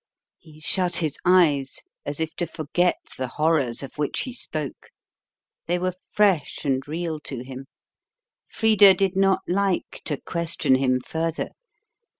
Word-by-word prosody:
He 155 -2 -17
shut 180 +3 +2
his 155 -4 0
eyes 155 -7 +3 0.2
as 145 +1 -2
if 160 0 -3
to 175 - -1
forget 175 +3 0 0.2
the 130 - -1
horrors 145 -3 +1
of 135 +2 -10
which 145 - -1
he 255 - -5
spoke. 155 - -5 0.8
They 175 +1 +1
were 185 +1 -1 0.2
fresh 195 -8 +2
and 135 -2 +1
real 160 0 -3
to 135 -4 -6
him. 130 +1 -9 0.8
Frida 210 -3 +6
did 190 -1 0
not 195 0 +3
like 195 0 -1
to 145 - -1
question 170 -5 0
him 130 -1 +2
further. 165 +4 -2
160 Hz, 145 wpm, -24 LUFS, 140-180 Hz, 0.8 s, Frida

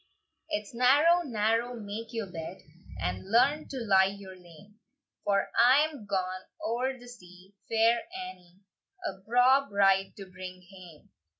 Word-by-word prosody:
69.) 310 - +1
"IT'S 285 - -15
narrow, 290 +8 +4
narrow, 230 -2 -1
make 215 +2 -7
your 225 -3 -3
bed, 175 0 -7 0.4
And 90 - -4
learn 280 +7 +3
to 270 - -7
lie 190 -4 +4
your 190 -2 -11
lane: 185 +4 -17 0.4
For 200 -1 0
I'm 275 -2 +3
ga'n 185 -1 -2 0.2
oer 255 +4 -1
the 245 0 -14
sea, 185 -5 -15 0.2
Fair 230 +1 +3
Annie, 275 - -10 0.4
A 195 - -4
braw 245 +6 +3
bride 195 -1 +3
to 195 - -8
bring 185 0 -10
hame. 180 -5 -15
210 Hz, 140 wpm, -29 LUFS, 190-245 Hz, 0.4 s, narrow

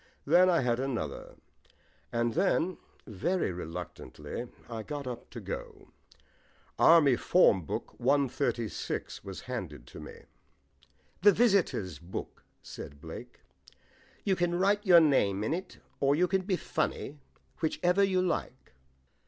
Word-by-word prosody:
Then 175 +5 +6
I 170 -4 +3
had 120 -1 +1
another. 120 - -4 0.8
And 115 0 0
then, 185 0 +1 0.3
very 115 - -1
reluctantly, 85 - -7 0.2
I 115 -2 -5
got 145 +3 -6
up 125 -2 -7
to - - -8
go. - - -7 0.9
Army 155 -6 +7
Form 105 - +4
Book - - -5
136 130 -3 -1
was - - -7
handed - - -6
to - - -11
me. - - -11 1.0
"The 205 +2 +8
visitors' 190 - +1
book," 85 +2 -7 0.2
said 70 +1 -9
Blake. 80 +1 -10 0.8
"You 195 -2 +2
can 175 -1 0
just 175 - -1
write 205 +2 +3
your 180 -5 +8
name 105 -10 +2
in 125 - 0
it, 180 +2 -5 0.2
or 140 +1 +3
you 180 +4 +3
can 190 +1 +1
be 190 -2 +1
funny, 145 -3 -3 0.4
whichever 180 +4 +2
you 185 -2 +2
like." 175 - -3
145 Hz, 130 wpm, -30 LUFS, 110-180 Hz, 1.0 s, The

